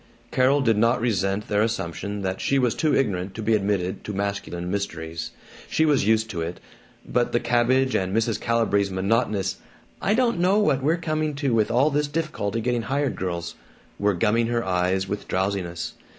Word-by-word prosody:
Carol 135 Hz, +3 st, +3 dB
did 115 Hz, -5 st, +2 dB
not 115 Hz, +2 st, +3 dB
resent 100 Hz, -3 st, 0 dB
their 105 Hz, 0 st, +1 dB
assumption 100 Hz, -2 st, -2 dB
that 95 Hz, 0 st, -2 dB
she 140 Hz, -, +1 dB
was 125 Hz, -3 st, +2 dB
too 155 Hz, -2 st, +1 dB
ignorant 95 Hz, -6 st, -1 dB
to 110 Hz, -, -5 dB
be 110 Hz, +2 st, +2 dB
admitted 100 Hz, -3 st, 0 dB
to 105 Hz, -, -4 dB
masculine 100 Hz, -3 st, -3 dB
mysteries. 85 Hz, -5 st, -4 dB, 0.4 s
She 160 Hz, -, +2 dB
was 145 Hz, -9 st, +2 dB
used 110 Hz, 0 st, +3 dB
to 85 Hz, -, -3 dB
it. 85 Hz, +2 st, -4 dB, 0.5 s
But 120 Hz, -1 st, 0 dB
the 120 Hz, -, +3 dB
cabbage 125 Hz, +2 st, +2 dB
and 95 Hz, 0 st, 0 dB
Mrs. 115 Hz, +1 st, 0 dB
Calibree's 110 Hz, -4 st, +1 dB
monotonous 100 Hz, 0 st, 0 dB, 0.4 s
"I 210 Hz, -, +2 dB
don't 235 Hz, -6 st, +2 dB
know 185 Hz, +3 st, +3 dB
what 150 Hz, -10 st, +2 dB
we're 155 Hz, +5 st, +2 dB
coming 155 Hz, -2 st, -1 dB
to 140 Hz, -3 st, 0 dB
with 110 Hz, -2 st, +2 dB
all 130 Hz, +6 st, +3 dB
this 145 Hz, +1 st, +1 dB
difficulty 145 Hz, -9 st, -2 dB
getting 120 Hz, 0 st, 0 dB
hired 140 Hz, +4 st, -1 dB
girls" 85 Hz, -2 st, -3 dB, 0.5 s
were 100 Hz, -1 st, +2 dB
gumming 115 Hz, +5 st, +2 dB
her 120 Hz, -1 st, -1 dB
eyes 95 Hz, +1 st, 0 dB
with 100 Hz, +1 st, -4 dB
drowsiness. 95 Hz, -3 st, -2 dB
110 Hz, 180 wpm, -24 LUFS, 95-130 Hz, 0.5 s, Carol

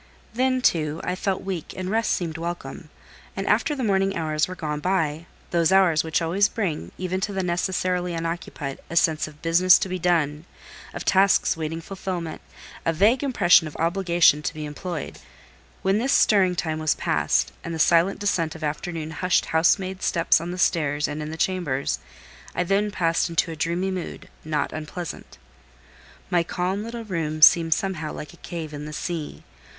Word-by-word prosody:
Then, 255 Hz, +1 st, +1 dB
too, 155 Hz, -5 st, +1 dB
I -, -, -1 dB
felt 190 Hz, 0 st, -2 dB
weak, 185 Hz, -5 st, -5 dB
and 185 Hz, -1 st, -4 dB
rest 225 Hz, 0 st, +1 dB
seemed 165 Hz, -2 st, -2 dB
welcome; 170 Hz, +1 st, -6 dB, 0.5 s
and -, -, -3 dB
after 300 Hz, -, +2 dB
the 265 Hz, -, -3 dB
morning 195 Hz, -2 st, +1 dB
hours 155 Hz, -2 st, 0 dB
were 185 Hz, -, -7 dB
gone 150 Hz, -3 st, -3 dB
by,—those 170 Hz, 0 st, -1 dB
hours 185 Hz, -5 st, +4 dB
which 165 Hz, +1 st, 0 dB
always 190 Hz, +5 st, +2 dB
bring, 160 Hz, -, -3 dB
even 185 Hz, +1 st, -2 dB
to 205 Hz, -, -1 dB
the 195 Hz, -1 st, -2 dB
necessarily 180 Hz, 0 st, -1 dB
unoccupied, 165 Hz, -4 st, -4 dB
a 170 Hz, -, -6 dB
sense 160 Hz, -2 st, +2 dB
of 150 Hz, -1 st, -15 dB
business 170 Hz, +2 st, +6 dB
to -, -, -2 dB
be 185 Hz, 0 st, -4 dB
done, 160 Hz, -3 st, +1 dB, 0.5 s
of -, -, -7 dB
tasks 195 Hz, +1 st, +4 dB
waiting 160 Hz, 0 st, -4 dB
fulfilment, 180 Hz, -3 st, -5 dB, 0.4 s
a 165 Hz, -, +2 dB
vague 210 Hz, +10 st, +3 dB
impression 185 Hz, -, +4 dB
of 150 Hz, -, -10 dB
obligation 170 Hz, -2 st, +3 dB
to 150 Hz, -, -3 dB
be 155 Hz, -1 st, -5 dB
employed—when 150 Hz, -, -5 dB
this 260 Hz, +4 st, 0 dB
stirring 190 Hz, -4 st, +4 dB
time 160 Hz, -2 st, -2 dB
was 155 Hz, -1 st, +1 dB
past, -, -, +1 dB
and 170 Hz, -, -5 dB
the 165 Hz, -, -3 dB
silent 170 Hz, +4 st, +3 dB
descent 170 Hz, -6 st, 0 dB
of 160 Hz, -, -9 dB
afternoon 155 Hz, +1 st, -3 dB
hushed 180 Hz, +3 st, +1 dB
housemaid 185 Hz, +3 st, +2 dB
steps 165 Hz, -2 st, +2 dB
on 170 Hz, -, -5 dB
the 180 Hz, -, -5 dB
stairs 150 Hz, -5 st, +1 dB
and 150 Hz, +1 st, -5 dB
in 150 Hz, -, -5 dB
the 160 Hz, -, -6 dB
chambers, 165 Hz, -8 st, -1 dB, 0.6 s
I 180 Hz, -, +1 dB
then 200 Hz, +3 st, +1 dB
passed 170 Hz, -3 st, 0 dB
into 165 Hz, 0 st, 0 dB
a -, -, -5 dB
dreamy 170 Hz, +5 st, -1 dB
mood, 185 Hz, -2 st, -6 dB
not 155 Hz, -2 st, -2 dB
unpleasant. 155 Hz, +2 st, -7 dB, 0.9 s
My 175 Hz, -, +4 dB
calm 180 Hz, +4 st, -2 dB
little 230 Hz, +1 st, -6 dB
room 155 Hz, -5 st, -2 dB
seemed 165 Hz, 0 st, +7 dB
somehow 170 Hz, -6 st, -3 dB
like 150 Hz, -, -8 dB
a -, -, -16 dB
cave 165 Hz, -4 st, -7 dB
in 145 Hz, 0 st, -6 dB
the 150 Hz, -, -7 dB
sea. 160 Hz, 0 st, -5 dB
170 Hz, 175 wpm, -24 LUFS, 155-185 Hz, 0.9 s, seemed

